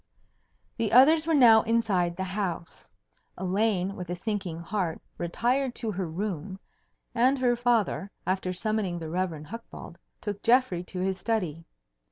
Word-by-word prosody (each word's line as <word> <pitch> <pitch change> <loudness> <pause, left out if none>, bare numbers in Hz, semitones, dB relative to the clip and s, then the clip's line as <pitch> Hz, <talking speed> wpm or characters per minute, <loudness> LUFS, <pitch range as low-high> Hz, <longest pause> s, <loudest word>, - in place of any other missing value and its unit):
The 225 -3 -1
others 305 +6 +6
were 325 - +3
now 230 -5 +7
inside 205 -7 +1
the 190 - -3
house. 185 -3 -4 0.5
Elaine 195 0 0
with 180 -2 -7
a 175 - -2
sinking 190 -3 -3
heart 170 -1 -2 0.2
retired 245 +9 0
to 225 -3 -2
her 190 -2 -3
room, 185 +1 -4 0.5
and 255 +3 +3
her 250 -2 +2
father 235 -5 +1 0.2
after 185 0 -1
summoning 195 -1 -1
the 160 -2 -6
Rev. 175 -4 -2
Hucbald 230 +9 -10 0.2
took 205 -1 -5
Geoffrey 240 -7 +3
into 180 +1 -6
his 190 0 -1
study. 175 -8 -2
195 Hz, 145 wpm, -27 LUFS, 180-230 Hz, 0.5 s, now